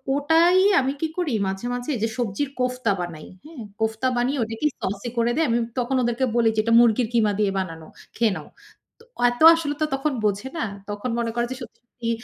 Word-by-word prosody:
ওটাই 325 +5 +4 0.2
আমি 270 +1 0
কি 320 - +1
করি 325 -8 -1
মাঝে, 195 +4 -4
মাঝে 245 +4 -3
যে - - +2
সবজির 245 +4 -2
কোফতা 250 -3 0
বানাই, 165 -3 -7 0.2
হ্যাঁ? 305 -8 -9 0.2
কোফতা 220 +3 0
বানিয়ে 260 +3 0
ওটাকে 225 +7 -2
সসি 200 +5 -3
করে 235 +1 +2
দেই। 325 0 +2
আমি 230 - +2 0.2
তখন 250 +2 -1
ওদেরকে 240 +2 0
বলি 230 -1 +4
যে - - 0
এটা 230 0 +1
মুরগির 235 0 +4
কিমা 215 -3 +3
দিয়ে 200 -2 +2
বানানো। 165 -4 -6 0.3
খেয়ে 225 -4 +2
নাও। 150 - -10 0.5
তো - - -18 0.3
এত 245 +5 -7
আসলে 295 -3 -3
তো - - +4
তখন 285 +2 -1
বোঝে 205 +6 -1
না। 315 - -1 0.2
তখন 205 +4 -4
মনে 230 -1 -1
করে 240 - +1
যে - - -9
সত্যি, - - -11
সত্যি 230 -1 -5
240 Hz, 205 wpm, -23 LUFS, 220-270 Hz, 0.5 s, ওটাই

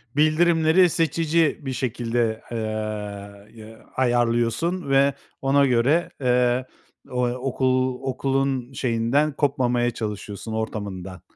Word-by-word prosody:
Bildirimleri 160 +3 +4
seçici 165 0 +1
bir 135 -2 -4
şekilde, 120 -2 -1
eee, 120 - -3 1.0
ya 110 +1 -14
ayarlıyorsun 120 +7 +1
ve 135 +1 +4 0.3
ona 140 +1 +3
göre, 135 +7 +2
eee, 125 0 +2 0.5
o 125 0 +1
okul 130 0 0
okulun, 135 -1 -1
şeyinden, 130 +5 +1
kopmamaya 125 -4 +1
çalışıyorsun 105 0 -6
ortamından. 100 -5 -5
130 Hz, 95 wpm, -23 LUFS, 115-140 Hz, 1.0 s, Bildirimleri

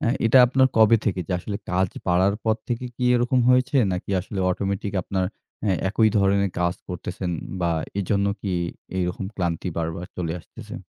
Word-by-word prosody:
অ্যা 115 - +1 0.2
এটা 120 +4 +6
আপনার 130 +1 +4
কবে 110 +1 +7
থেকে 95 -4 0
যে, - - -3
আসলে 100 +3 -4
কাজ 95 +1 +2 0.2
বাড়ার 95 +3 +3
পর 110 -1 +2
থেকে 120 +1 -2
কি 125 - -2
এরকম 120 +1 +2
হয়েছে? 125 +2 +3 0.2
নাকি 90 +2 -4
আসলে 100 +2 -7
অটোমেটিক 100 +1 -2
আপনার 95 0 -1 0.4
অ্যা 100 -3 +2
একই 110 +2 +3
ধরনের 100 0 +2
কাজ 85 0 +1
করতেসেন 90 - -4 0.3
বা 85 -1 +1 0.3
এজন্য 100 +1 +1
কি 100 - -2 0.4
এইরকম 90 +1 -1
ক্লান্তি 85 0 -1
বারবার 80 +1 -3
চলে 85 -3 -2
আসতেসে? - - -10
100 Hz, 170 wpm, -24 LUFS, 90-110 Hz, 0.4 s, কবে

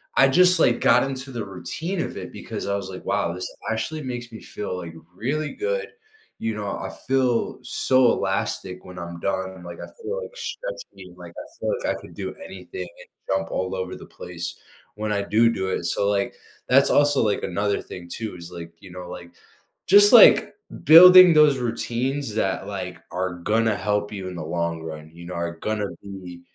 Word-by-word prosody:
I 135 - +6
just, 180 +4 +5
like, 120 - +3
got 125 +2 +5
into 135 0 -5
the 115 -4 -4
routine 155 - -4
of - - -5
it - - -7
because - - -6
I 100 - 0
was, 100 -1 -4
like, 95 - -9
"Wow, 100 -4 0
this 90 +1 -5 0.2
actually 150 +7 -3
makes 120 -2 -6
me 110 - -10
feel, 105 -3 -5
like, 85 -2 -7 0.2
really 145 +9 -2
good." 460 +2 -2 0.5
You 115 -1 -2
know, 105 - -5
I - - -5 0.2
feel 130 -3 +1
so 130 -2 +3
elastic 95 -1 -2
when 90 0 -10
I'm 85 0 -7
done, 95 -2 -3
like, 85 0 -9
I - - -7 0.2
feel 465 +4 -3
like 480 +1 -9
stretching, - - -8
like, - - -11
I - - -9
feel - - -1
like - - 0
I - - -8
could - - -13
do - - -5
anything 390 - -8
and - - -14 0.2
jump 95 0 0
all 95 0 -2
over 95 0 -4
the - - -11
place 85 -1 -7 0.4
when 105 0 -2
I 100 - 0
do 110 +3 +3
do 95 -3 -2
it, 90 - -2
so, 100 +3 0
like, 100 -1 0 0.3
that's 135 +2 +5
also, 145 -1 +4
like, 105 -2 0
another 100 +3 -1
thing 85 -1 -10
too 110 -4 -5
is, 85 0 -10
like, 85 -1 -9
you 95 - -13
know, 90 -1 -8
like 85 -1 -9 0.6
just, 205 +2 +8
like, 235 - +8 0.3
building 180 +3 +10
those 150 -3 +5
routines 120 +1 -2
that, 95 -2 -1
like, 90 -3 -6
are 90 -1 -2
gonna 110 +5 +1
help 105 0 -1
you 95 -3 -6
in 90 - -7
the 85 - -5
long 85 -1 -2
run, 80 -1 -8
you 85 +1 -12
know, 90 - -7
are 85 0 -3
gonna 105 +2 -2 0.2
be, 95 -3 -9
105 Hz, 200 wpm, -23 LUFS, 90-135 Hz, 0.6 s, building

